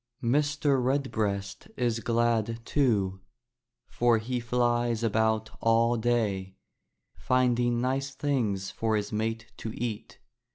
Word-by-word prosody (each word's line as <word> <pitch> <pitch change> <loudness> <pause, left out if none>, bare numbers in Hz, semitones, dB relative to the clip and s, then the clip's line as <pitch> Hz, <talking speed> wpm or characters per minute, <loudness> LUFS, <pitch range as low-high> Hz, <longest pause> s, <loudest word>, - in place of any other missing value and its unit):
Mr. 145 +1 +2
Redbreast 110 -7 -1
is 120 -2 0
glad, 115 -1 0
too, 100 -9 +1 0.7
for 120 -1 +2
he 120 +3 -2
flies 120 -1 0
about 110 -1 +1
all 115 +1 +3
day, 110 -5 0 0.6
finding 120 -1 +1
nice 135 +2 -1
things 115 -10 -1
for 110 -1 0
his 105 0 -2
mate 115 +1 -2
to 110 - -5
eat. 115 -3 -5
115 Hz, 110 wpm, -28 LUFS, 110-125 Hz, 0.7 s, all